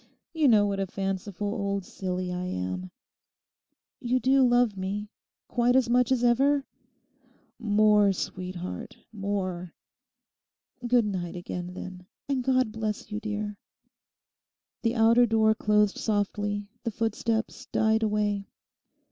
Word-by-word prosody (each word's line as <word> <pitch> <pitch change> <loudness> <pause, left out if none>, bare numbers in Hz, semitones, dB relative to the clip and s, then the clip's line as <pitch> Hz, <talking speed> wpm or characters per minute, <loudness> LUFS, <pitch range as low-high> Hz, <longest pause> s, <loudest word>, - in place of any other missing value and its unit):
You 315 -3 +3
know 215 -4 +5
what 200 -1 -1
a 195 - -1
fanciful 195 +1 -3
old 200 -2 -2
silly 185 -1 -3
I 180 0 -3
am. 90 - -4 1.1
You 250 +1 +1
do 265 +2 +4
love 245 -4 +4
me? 200 +3 -4 0.4
Quite 245 +1 +2
as 255 -2 +3
much 250 +1 +3
as 250 -2 +2
ever?' 275 +4 +3 0.9
'More, 210 -2 +4
sweetheart, 180 -1 -5 0.2
more!' 185 -4 -3 1.1
'Good 240 -2 +4
night 185 -4 -3
again, 180 0 -6
then; 180 -1 -8 0.2
and 270 -3 0
God 255 -3 +2
bless 215 -1 -4
you, 210 - -2
dear.' 210 -1 -4 1.2
The 230 0 0
outer 230 +1 +5
door 220 -1 +4
closed 210 -1 +2
softly, 205 -1 -1
the 235 - -2
footsteps 225 +1 -2
died 220 0 +2
away. 210 -2 0
210 Hz, 120 wpm, -27 LUFS, 195-230 Hz, 1.2 s, know